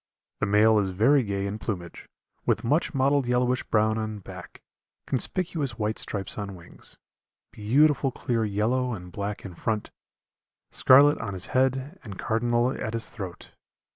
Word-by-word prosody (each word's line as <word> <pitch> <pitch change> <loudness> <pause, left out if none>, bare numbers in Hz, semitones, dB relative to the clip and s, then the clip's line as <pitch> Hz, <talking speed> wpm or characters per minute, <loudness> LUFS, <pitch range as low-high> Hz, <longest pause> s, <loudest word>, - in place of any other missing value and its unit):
The - - 0
male 105 +2 +5
is 100 -2 0
very 115 +10 +4
gay 100 -3 -2
in 100 +2 -4
plumage, 90 -7 -6 0.3
with - - 0
much 150 +5 +1
mottled 135 0 +2
yellowish 125 +1 +1
brown 110 0 +1
on 110 -1 -4
back, 100 - -11 0.5
conspicuous 145 - -2
white 105 +1 -1
stripes 100 0 -2
on 100 -1 -5
wings, 85 -1 -13 0.5
beautiful 135 +6 +3
clear 120 -2 -1
yellow 115 +5 0
and 90 -2 -10
black 100 +3 -5
in 95 - -7
front, 110 +4 -3 0.8
scarlet 145 +3 +6
on 100 -4 -4
his 95 - -1
head 130 +6 0
and 100 -6 -8
cardinal 120 +2 +1
at 110 -4 -4
his 115 -1 -3
throat. 95 -6 -8
110 Hz, 150 wpm, -26 LUFS, 100-130 Hz, 0.8 s, scarlet